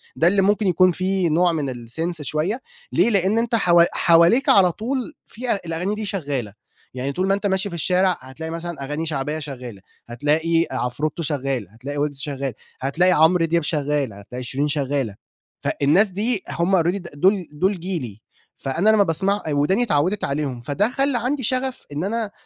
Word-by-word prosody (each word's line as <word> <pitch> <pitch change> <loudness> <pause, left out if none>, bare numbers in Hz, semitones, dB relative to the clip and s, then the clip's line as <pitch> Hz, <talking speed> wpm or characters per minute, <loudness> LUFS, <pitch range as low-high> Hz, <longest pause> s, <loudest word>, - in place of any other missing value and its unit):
ده 165 - +3
اللي 195 +2 +4
ممكن 205 +1 +2
يكون 185 +1 +4
في 185 0 +1
نوع 175 +3 +3
من 145 -5 -2
الsense 155 +8 -4
شوية 155 - -1 0.3
ليه، - - +3
لأن 200 0 +2
أنت 230 0 +1
ح 180 -6 +1 0.2
حواليك 170 +10 +4
على 185 -3 +6
طول 245 +7 -3
في 245 +2 -4
الأغاني 175 +5 -2
دي 215 0 -4
شغالة 140 - -3 0.4
يعني 130 +2 -3
طول 185 +7 -1
ما 195 - +3
أنت 200 +1 0
ماشي 190 +1 0
في 170 - -6
الشارع 180 +2 +2
هتلاقي 130 +5 -8
مثلًا، 170 -2 -5
أغاني 150 +4 -3
شعبية 150 0 -2
شغالة 125 -9 -8 0.3
هتلاقي 160 +7 +1
عفروتو 150 +7 -2
شغال، 135 - -1
هتلاقي 130 +7 -7
ويجز 145 -1 -2
شغال، 140 -2 -3 0.3
هتلاقي 165 +7 +2
عمر 165 +1 +4
دياب، 170 0 +1
شغال 145 -5 -1
هتلاقي 115 +6 -8
شيرين 135 +4 -1
شغالة. 140 -7 -1 0.5
فالناس 165 +9 +3
دي 210 +2 -1
هم 175 +3 +1
already 180 +4 0
دول 185 +4 +2
دول 185 +5 0
جيلي 150 - -5 0.4
فأنا 165 +10 0
لما 215 -2 +5
باسمع 195 +4 0
وداني 150 +11 +2
اتعودت 185 0 0
عليهم، 140 -3 -2
فده 160 - 0
خلى 270 0 0
عندي 260 +3 -1
شغف 255 +2 -1
إن 145 +3 -3
أنا 215 +1 -2
165 Hz, 170 wpm, -22 LUFS, 145-195 Hz, 0.5 s, على